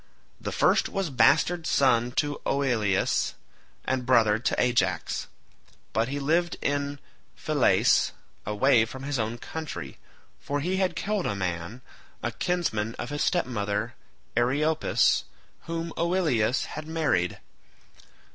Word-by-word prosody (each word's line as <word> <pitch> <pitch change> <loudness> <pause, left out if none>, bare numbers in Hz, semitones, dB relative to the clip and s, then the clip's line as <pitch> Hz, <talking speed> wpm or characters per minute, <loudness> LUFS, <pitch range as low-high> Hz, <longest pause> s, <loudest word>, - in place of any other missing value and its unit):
The - - -4
first - - +3
was 195 -6 -2
bastard 160 +7 +3
son 120 -3 +3
to 145 +1 -1
Oileus, 115 -8 +1 0.5
and 130 -1 0
brother 115 -4 +4
to 120 - -1
Ajax, 95 -9 0 0.7
but 110 +2 +1
he 140 +2 -3
lived 165 +5 +1
in 145 0 -1 0.4
Phylace - - +3 0.3
away 110 +3 +3
from 130 +4 -9
his 140 -2 -2
own 110 +2 -2
country, 120 - -7 0.4
for 145 0 -2
he 180 +6 -1
had 185 -3 0
killed 205 -2 -1
a 105 - -1
man, 90 +5 -4 0.4
a - - -1
kinsman 115 -12 -1
of 120 - -6
his 145 - -1
stepmother 105 - -1 0.4
Eriopis 145 +7 +2 0.4
whom 165 0 -3
Oileus 155 - +1
had 155 0 -7
married. 145 - 0
130 Hz, 120 wpm, -27 LUFS, 110-160 Hz, 0.7 s, brother